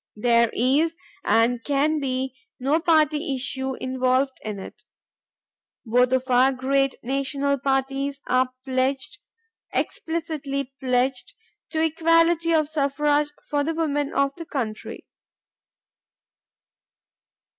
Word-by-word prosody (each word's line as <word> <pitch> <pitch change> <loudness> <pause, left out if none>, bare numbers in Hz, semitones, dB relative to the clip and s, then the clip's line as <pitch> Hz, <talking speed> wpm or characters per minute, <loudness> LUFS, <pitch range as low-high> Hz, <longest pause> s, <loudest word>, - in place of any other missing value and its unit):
There 235 +1 +3
is 290 +7 +2 0.3
and 230 +1 +2
can 295 +2 +1
be 260 -1 -2 0.3
no 280 +5 +2
party 310 -3 +2
issue 265 0 -3
involved 260 +1 0
in 215 -2 -4
it. 190 - -10 1.0
Both 245 +2 +3
of 260 0 +1
our 255 +1 +4
great 270 +1 +1
national 275 +2 -1
parties 275 +1 -1
are 255 0 +2 0.2
pledged, 260 0 -1 0.5
explicitly 295 -5 -3
pledged, 255 0 0 0.3
to 320 -1 0
equality 330 +1 +3
of 310 -2 +3
suffrage 295 0 +1 0.2
for 290 -1 0
the 325 +2 -2
women 290 -3 -1
of 275 0 +1
the 335 - -7
country. 225 -6 -5
275 Hz, 105 wpm, -24 LUFS, 255-300 Hz, 1.0 s, our